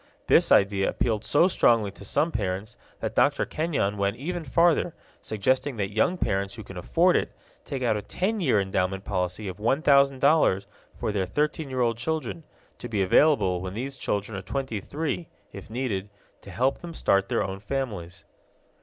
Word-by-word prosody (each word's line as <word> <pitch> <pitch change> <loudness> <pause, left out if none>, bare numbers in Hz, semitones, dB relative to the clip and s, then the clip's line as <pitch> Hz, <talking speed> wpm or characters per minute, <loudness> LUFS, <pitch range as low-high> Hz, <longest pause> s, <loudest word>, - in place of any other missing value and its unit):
This - - +4
idea 100 -1 +4
appealed 110 -3 -1
so 160 +5 +4
strongly 115 - +3
to 100 - -14
some 155 +11 +1
parents 95 -1 -3 0.3
that - - -2
Dr. - - +3
Kenyon 140 -11 -1
went 100 +2 0
even 175 +5 -4
further, 165 +2 +2 0.3
suggesting 130 +5 0
that 100 -1 -2
young 170 - +2
parents 100 - -1
who 110 - -8
can 100 - -11
afford 170 - +2
it - - 0 0.3
take 135 -3 -4
out 115 -3 +2
a 105 - -2
ten 205 - -2
year 125 - +3
endowment 95 0 -1
policy 90 +1 -2
of 90 -1 -6
$1000 140 -2 +3 0.3
for - - -2
their 95 -3 -1
thirteen 150 - -1
year 130 -1 -2
old 115 -1 +1
children, 120 - -3 0.4
to - - -7
be 105 -3 +1
available 95 - +3
when 95 +1 -5
these 135 +4 -4
children 105 -4 -3
are 100 - -4
twenty 130 -3 -3
three, 160 - -3 0.3
if 100 - -10
needed, 110 -5 -3 0.3
to - - -12
help 130 +3 0
them 170 -1 -8
start 100 0 +2
their - - +1
own 95 0 -5
families. 105 -7 -5
110 Hz, 175 wpm, -26 LUFS, 100-140 Hz, 0.4 s, This